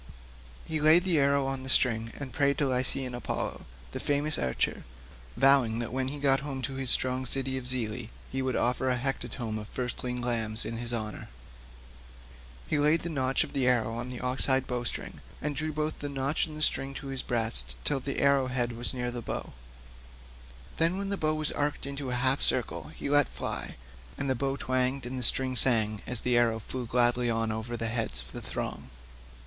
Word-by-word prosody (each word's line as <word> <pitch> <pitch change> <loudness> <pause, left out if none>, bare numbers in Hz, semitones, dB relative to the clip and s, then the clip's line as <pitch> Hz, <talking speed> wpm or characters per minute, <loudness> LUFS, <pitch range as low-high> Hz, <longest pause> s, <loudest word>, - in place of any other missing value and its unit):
He 155 -1 -2
laid 155 +3 +6
the 175 -5 +3
arrow 140 0 +3
on 135 -1 -2
the 130 - -7
string 115 -3 +2
and 135 -3 -6
prayed 140 -2 +2
to 145 - +1
Lycian 130 0 0
Apollo, 120 - -4 0.3
the - - -5
famous 145 +2 +1
archer, 65 -2 -1 0.5
vowing 135 -4 +5
that 120 0 -3
when 130 0 0
he 145 +2 -3
got 135 -1 +3
home 135 -2 -5
to 135 - -2
his 135 -1 -1
strong 130 +1 +3
city 130 +1 +2
of 130 -1 -2
Zelea 120 -2 0 0.2
he 135 - -2
would 130 -1 -1
offer 125 +2 +1
a 125 - +2
hecatomb 120 -3 -3
of 105 - -8
firstling 125 0 -4
lambs 115 -3 0
in 115 - -3
his 120 +1 -5
honour. 110 -3 -4 1.4
He 150 - 0
laid 150 +3 +3
the 170 - -4
notch 135 -3 +1
of - - -9
the 135 -3 +1
arrow 115 -3 +2
on 120 +2 -4
the 125 -1 -5
ox 125 +1 +2
hide 130 -1 +3
bowstring, 120 -2 -4 0.2
and 150 -1 -3
drew 155 +2 -1
both 155 +1 -3
notch 140 +2 -1
and 155 0 -4
string 135 -1 0
to 135 +1 -6
his 135 -1 -2
breast 110 - 0
till 145 - +1
the 140 +1 -3
arrow 140 -2 +4
head 125 -1 0
was 120 +2 0
near 125 -1 -2
the 120 0 -5
bow; - - -5 1.2
then 170 +3 +3
when 200 0 -3
the 200 - 0
bow 155 -4 0
was 155 -1 -2
arched 145 -1 -2
into 140 -1 -4
a 125 - -1
half 130 +2 +3
circle - - +1
he - - -6
let 145 -1 +5
fly, - - -4 0.4
and 140 -1 0
the - - +4
bow 135 +2 -1
twanged, 130 0 0
and 130 +1 -4
the - - -4
string 130 +1 +4
sang 110 -4 +3
as 125 -2 -1
the 125 -1 +1
arrow 115 -2 +2
flew 120 +2 -5
gladly 120 0 +3
on 115 -1 0
over 110 +2 -4
the 115 - -3
heads 110 - -2
of 65 - -9
the - - -7
throng. - - -5
130 Hz, 205 wpm, -29 LUFS, 120-140 Hz, 1.4 s, laid